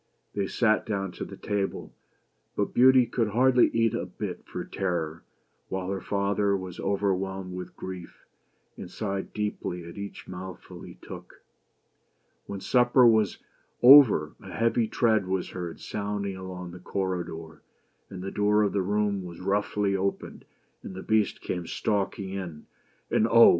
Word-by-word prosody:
They 100 -1 -1
sat 110 0 +2
down 95 -3 -2
to - - -6
table, 100 -1 -3 0.6
but 100 - -1
Beauty 130 0 +6
could 115 -1 0
hardly 125 +4 +4
eat 115 -1 +1
a - - -2
bit - - -6
for - - -5
terror, 85 -4 -2 0.5
while 95 0 -3
her 95 -2 -3
father 100 0 +1
was 95 -2 -8
overwhelmed 95 -1 -1
with 90 0 -7
grief, 90 -2 -8 0.5
and - - -8
sighed 100 0 -4
deeply 105 -4 -3
at 85 - -9
each 100 0 -7
mouthful 95 0 -8
he - - -10
took. - - -11 1.0
When 100 -1 -5
supper 125 +2 +4
was 110 -4 +4 0.5
over, 120 - +8
a - - -10
heavy 115 0 +1
tread 110 -5 +2
was 95 -1 -2
heard 85 -2 -6
sounding 100 -1 -3
along 90 -1 -7
the 90 - -10
corridor; 85 -4 -4 0.5
and 90 -1 -7
the 95 - -4
door 105 +1 +3
of 100 - 0
the 100 - +1
room 100 +1 0
was 85 -1 -9
roughly 100 +1 0
opened 95 +1 -3 0.4
and 95 - -8
the 95 - -7
Beast 110 -1 +1
came 90 -2 -4
stalking 100 -1 -1
in. 90 -6 -6 0.5
And, 110 - +3
Oh! 115 0 +9
100 Hz, 150 wpm, -27 LUFS, 90-105 Hz, 1.0 s, Oh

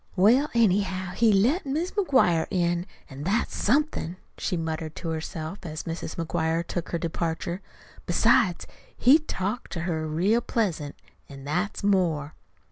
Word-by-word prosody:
"Well, 235 +10 +5
anyhow, 190 -4 +2
he 230 +3 +3
let 235 - +3
Mis' 310 +6 -2
McGuire 260 - +3
in 175 -1 0 0.2
an' 135 0 -9
that's 195 +9 0
somethin'," 245 - 0 0.2
she 180 - -2
muttered 160 -1 -4
to 170 - -5
herself, 160 +2 -4
as 155 -3 -6
Mrs. 165 -1 -5
McGuire 165 0 -1
took 175 -1 -4
her 170 - -1
departure. 170 +2 -3 0.5
"Besides, - - +3 0.3
he 275 +6 +6
talked 220 - -4
to 165 - -3
her 160 -2 -2
real 190 +10 +2
pleasant 170 -13 -1 0.3
an' 135 -1 -10
that's 180 +9 -2
more." 170 -7 +1
180 Hz, 140 wpm, -26 LUFS, 160-215 Hz, 0.5 s, he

